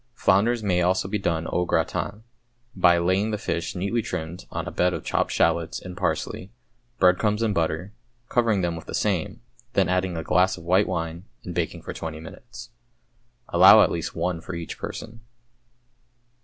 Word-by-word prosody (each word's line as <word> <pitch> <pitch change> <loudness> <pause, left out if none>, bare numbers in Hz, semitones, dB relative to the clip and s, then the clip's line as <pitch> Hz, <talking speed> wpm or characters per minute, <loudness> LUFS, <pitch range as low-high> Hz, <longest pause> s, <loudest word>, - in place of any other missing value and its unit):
Flounders 110 +3 +2
may 90 -3 +1
also 90 +1 +1
be 105 +2 -2
done 85 -4 -1
au 90 - +1
gratin, 100 +4 -1 0.5
by 90 -2 +5
laying 95 +5 +1
the 105 - -1
fish 85 -4 -3
(neatly 100 +6 -1
trimmed) 85 -3 -6
on - - -4
a - - -4
bed 90 0 +1
of - - -6
chopped - - 0
shallots 85 -1 +1
and 90 -1 -9
parsley, 90 +2 -3 0.5
breadcrumbs 105 +4 +3
and 110 -2 +1
butter, 85 +3 -1 0.3
covering 115 -5 +2
them 85 -1 -1
with 80 - -9
the - - -4
same, 100 +3 -1 0.3
then 95 -3 +3
adding 90 -1 0
a 80 - -3
glass 90 +4 +2
of 85 - -11
white 95 +4 +3
wine, 85 0 -4 0.2
and - - -6
baking - - -3
for - - -6
twenty 80 -1 -6
minutes. 120 +8 -11 0.8
Allow 95 +5 +8
at - - +1
least 85 0 -4
one 85 0 -2
for 90 - -7
each 85 -1 -6
person. 115 0 -7
90 Hz, 175 wpm, -25 LUFS, 85-105 Hz, 0.8 s, Allow